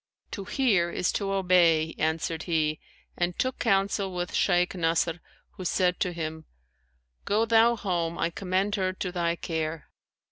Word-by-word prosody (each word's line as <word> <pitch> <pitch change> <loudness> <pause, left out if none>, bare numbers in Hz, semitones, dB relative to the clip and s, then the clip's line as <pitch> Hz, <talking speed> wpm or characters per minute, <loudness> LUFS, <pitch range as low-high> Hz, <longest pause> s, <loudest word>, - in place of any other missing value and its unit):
'To 195 - -5
hear 200 -9 +2
is 180 - 0
to 200 -1 -2
obey,' 175 -4 +3
answered 160 +1 -1
he 155 -2 +1 0.4
and 175 0 -1
took 255 0 -1
counsel 195 0 +1
with 180 0 -4
Shaykh 180 -2 +2
Nasr 165 -1 0 0.3
who 185 - -9
said 180 0 +1
to 180 - 0
him, 160 -2 -5 0.8
'Go 215 +3 +2
thou 230 +1 +4
home, 175 -5 -2
I 170 - 0
commend 190 +3 -1
her 185 -1 0
to 185 -1 -4
thy 170 -2 0
care.' 160 -2 -4
180 Hz, 150 wpm, -27 LUFS, 165-195 Hz, 0.8 s, thou